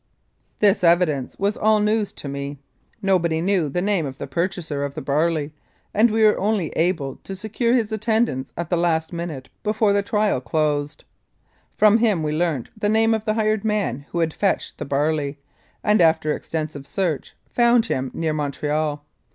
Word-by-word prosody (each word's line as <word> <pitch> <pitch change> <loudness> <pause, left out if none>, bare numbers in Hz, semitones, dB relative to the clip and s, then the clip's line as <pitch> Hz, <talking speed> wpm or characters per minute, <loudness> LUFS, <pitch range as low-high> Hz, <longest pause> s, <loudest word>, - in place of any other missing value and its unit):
This 205 -2 +4
evidence 170 -6 +2
was 200 +2 0
all 215 0 +3
news 210 0 +1
to - - -8
me. 140 +1 -5 0.5
Nobody 170 -4 +2
knew 180 -3 +1
the 175 +6 -1
name 195 -7 +1
of 135 -1 -8
the - - -5
purchaser 170 -5 -2
of 140 0 -4
the - - -4
barley, 150 +1 0 0.4
and 220 +3 +4
we 220 +1 +2
were 215 -1 +5
only 200 -5 0
able 160 -6 -1
to 195 - -8
secure 220 +4 -1
his 225 -3 0
attendance 220 - 0
at 170 0 -4
the 175 - +3
last 165 -1 0
minute 165 -6 -5
before 215 -1 +2
the 200 - +3
trial 210 - 0
closed. 145 +3 -1 0.7
From 215 +1 +5
him 210 -8 +2
we 150 - -1
learnt 155 -5 -1
the 210 -1 -1
name 225 +1 +3
of 220 -1 -2
the 215 - +1
hired 215 -1 +1
man 205 - -1
who - - -5
had 165 -2 +1
fetched 200 - -1
the - - -4
barley, 145 +1 0 0.5
and 210 -2 +4
after 160 -2 +3
extensive 155 -3 -5
search, 175 -7 -2 0.2
found 235 -1 +4
him 130 - -2
near 160 -2 -1
Montreal. 150 0 -2
170 Hz, 175 wpm, -22 LUFS, 150-210 Hz, 0.7 s, were